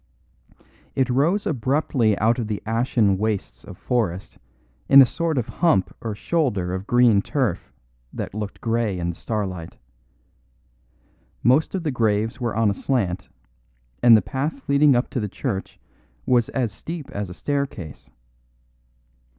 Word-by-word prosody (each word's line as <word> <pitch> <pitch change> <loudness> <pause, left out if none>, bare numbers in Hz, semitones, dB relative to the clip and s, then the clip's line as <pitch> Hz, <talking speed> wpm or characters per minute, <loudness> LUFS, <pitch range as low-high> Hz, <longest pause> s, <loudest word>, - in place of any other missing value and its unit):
It 130 -1 +1
rose 165 +11 +1
abruptly 130 -4 +1
out 115 +4 +2
of 115 - -2
the 105 -2 -3
ashen 110 -3 +1
wastes 105 -2 -3
of - - -11
forest 100 -7 -2 0.5
in 140 - +9
a 135 - +10
sort 165 +3 -2
of 120 - -1
hump 165 - +1
or 110 -3 -4
shoulder 105 - -1
of 95 +2 -5
green 120 -4 +4
turf 120 - -2 0.4
that - - -6
looked 105 -1 -6
grey 115 -4 0
in 85 -1 -2
the 85 - -4
starlight. 95 -5 -4 1.7
Most 130 - +3
of 185 - -3
the 155 - -1
graves 115 0 0
were 120 -2 -2
on 110 -2 +3
a - - -1
slant, 95 -6 -2 0.7
and 115 -2 +8
the 105 - 0
path 150 - -3
leading 140 -1 +5
up 120 - +1
to 130 - -2
the 105 -2 -3
church 95 0 -4 0.5
was 120 -2 +2
as 125 -5 -1
steep 165 +3 -7
as 100 -2 -4
a - - -7
staircase. 140 - -4
115 Hz, 150 wpm, -23 LUFS, 100-135 Hz, 1.7 s, a